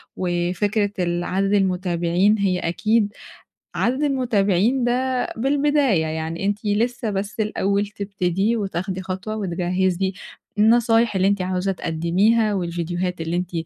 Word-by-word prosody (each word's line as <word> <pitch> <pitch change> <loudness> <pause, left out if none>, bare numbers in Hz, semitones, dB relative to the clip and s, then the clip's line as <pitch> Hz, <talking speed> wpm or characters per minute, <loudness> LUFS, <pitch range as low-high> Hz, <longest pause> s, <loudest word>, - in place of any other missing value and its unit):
وفكرة 185 +4 0
ال 175 -1 0
عدد 195 +2 0
المتابعين 185 0 +2
هي 190 -3 +1
أكيد 210 +5 +1 0.6
عدد 260 +4 0
المتابعين 240 -3 +1
ده 250 +1 0
بالبداية، 275 - +2
يعني 160 +3 -3
أنتِ 205 +1 -2
لسه 225 +3 0
بس 200 +2 -4
الأول 205 -1 0
تبتدي 200 +1 -1
وتاخدي 190 -2 -3
خطوة 190 +3 -5
وتجهِّزي 185 0 0 0.5
النصايح 225 0 +4
اللي 190 0 +3
أنتِ 200 -1 +1
عاوزة 185 +1 -1
تقدميها، 190 +6 +1
والفيديوهات 175 -1 -2
اللي 165 +1 -2
أنتِ 180 0 -3
195 Hz, 120 wpm, -22 LUFS, 180-220 Hz, 0.6 s, النصايح